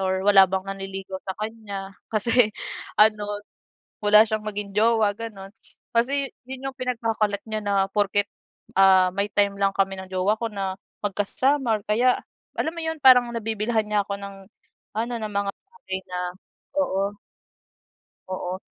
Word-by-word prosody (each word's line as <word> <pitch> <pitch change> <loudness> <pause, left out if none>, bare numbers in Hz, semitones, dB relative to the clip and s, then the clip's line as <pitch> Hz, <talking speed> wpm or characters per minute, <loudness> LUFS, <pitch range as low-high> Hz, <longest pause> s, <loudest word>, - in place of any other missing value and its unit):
or 190 0 0
wala 195 -2 +7
bang 190 0 -1
nanliligaw 195 -1 -5
sa 190 - -4
kanya. 205 -3 -5 0.2
Kasi 230 +1 +4 0.5
ano, 210 -1 +3 0.6
wala 210 +1 +8
siyang 215 -1 -2
maging 205 -1 -4
jowa, 220 -1 +4
gano'n. 205 -4 -8 0.4
Kasi 275 +4 +2 0.2
'yon 265 +1 -6
'yong 270 - -7
pinagkakalat 225 -5 -1
niya 215 0 -2
na 200 0 0 0.2
porket, 205 0 +1 0.5
ah, 190 -1 +6
may 200 +1 0
time 200 -1 +2
lang 195 0 +2
kami 195 0 +1
ng 190 0 -8
jowa 185 +3 +2
ko 230 - -2
na 195 -2 -3 0.3
magkasama 225 +4 +1
or - - -20
kaya 245 +4 +3 0.4
alam 320 - 0
mo 335 - -5
'yon, 320 0 -2
parang 250 -2 +8
nabibilhan 220 0 0
niya 210 -1 +2
ako 200 - -3
ng 200 0 -8 0.6
ano, 230 +2 -1
ng 215 -1 -4
mga 200 0 0
bagay 390 - -8
na 180 - -4 0.6
oo. 200 -6 0 1.2
Oo. 185 0 -3
205 Hz, 150 wpm, -24 LUFS, 195-230 Hz, 1.2 s, wala